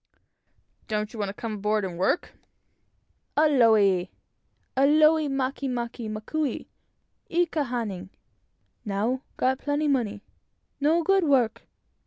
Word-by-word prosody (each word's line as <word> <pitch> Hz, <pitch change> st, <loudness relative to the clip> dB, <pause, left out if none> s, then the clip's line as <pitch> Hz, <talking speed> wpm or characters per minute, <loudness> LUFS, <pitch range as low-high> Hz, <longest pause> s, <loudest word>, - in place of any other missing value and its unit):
"Don't 215 Hz, 0 st, -2 dB
you 225 Hz, -, -8 dB
want 205 Hz, -1 st, -1 dB
to -, -, -5 dB
come 225 Hz, 0 st, -5 dB
aboard 210 Hz, 0 st, 0 dB
and 180 Hz, -2 st, -5 dB
work?" 190 Hz, -, 0 dB, 1.1 s
"Aole! 220 Hz, -, +4 dB, 0.7 s
aole 305 Hz, +3 st, +4 dB
make 270 Hz, 0 st, -2 dB
make 240 Hz, -3 st, -3 dB
makou 250 Hz, +6 st, -3 dB, 0.6 s
i 350 Hz, +1 st, +2 dB
ka 320 Hz, -2 st, -2 dB
hana. 210 Hz, -7 st, -4 dB, 0.7 s
Now, 220 Hz, +6 st, -1 dB, 0.2 s
got 260 Hz, +1 st, +1 dB
plenty 295 Hz, +1 st, -1 dB
money; 225 Hz, -7 st, 0 dB, 0.6 s
no 320 Hz, +4 st, +2 dB
good, 390 Hz, +2 st, +3 dB
work. 260 Hz, -7 st, +1 dB
245 Hz, 115 wpm, -26 LUFS, 210-290 Hz, 1.1 s, Aole